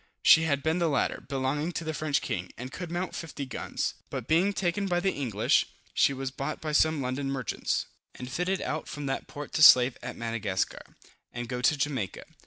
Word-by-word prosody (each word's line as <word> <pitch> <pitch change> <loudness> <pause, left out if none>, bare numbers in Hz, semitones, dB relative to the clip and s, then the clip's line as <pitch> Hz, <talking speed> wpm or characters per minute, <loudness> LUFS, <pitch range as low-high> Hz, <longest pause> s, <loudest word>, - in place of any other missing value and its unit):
She 165 0 +7
had 140 -3 0
been 160 +3 +1
the 170 -2 +2
latter, 140 -4 0
belonging 140 +5 -1
to 165 - -3
the 160 0 -3
French 150 -2 0
king, 90 0 -3
and 125 +2 -7
could 175 +2 -6
mount 175 +2 -3
50 150 -4 -5
guns; 130 - -3 0.2
but - - -5
being 175 +6 +3
taken 195 +1 -1
by 175 -2 +1
the 190 +2 +1
English, 115 -7 +1 0.3
she - - +4
was 135 -1 -4
bought 140 +3 -4
by 155 - -4
some 155 -1 +3
London 130 +2 -2
merchants, 130 -3 -1 0.3
and 125 - -7
fitted 180 +8 -1
out 155 - -3
from 145 -1 -6
that 135 0 -3
port 145 -1 -8
to - - 0
slave 125 -3 +8
at - - -6
Madagascar, 115 -5 -3 0.3
and 120 0 -5
go 125 0 -3
to 150 +4 +3
Jamaica. 135 -9 -2
145 Hz, 200 wpm, -28 LUFS, 130-160 Hz, 0.3 s, slave